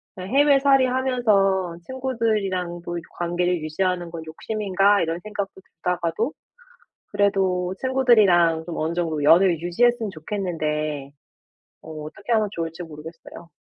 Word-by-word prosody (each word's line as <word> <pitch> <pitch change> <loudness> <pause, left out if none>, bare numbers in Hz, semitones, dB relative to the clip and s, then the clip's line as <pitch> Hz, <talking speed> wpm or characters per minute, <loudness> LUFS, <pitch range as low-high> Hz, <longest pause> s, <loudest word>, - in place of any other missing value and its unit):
그냥 185 0 -7
'해외살이 275 -2 +5
하면서 210 -9 +1
친구들이랑도 195 -9 -2
이렇게 165 - -8
관계를 175 0 0
유지하는 175 +3 -1
건 165 -1 -7
욕심인가.' 200 +3 +1
이런 165 +1 -2
생각도 205 -2 -6
들다가도 180 - -2 0.8
그래도 190 -3 +1
친구들이랑 210 -11 +4
좀 170 -1 -6
어느 160 +2 -1
정도 165 -4 -1
연을 165 +2 +5
유지했으면 225 +5 +1
좋겠는데 155 -5 -3 0.7
어 160 - -11
어떻게 205 +9 -6
하면 215 -2 +2
좋을지 165 0 -5
모르겠어요. 165 +2 -11
180 Hz, 340 characters per minute, -23 LUFS, 165-215 Hz, 0.8 s, 해외살이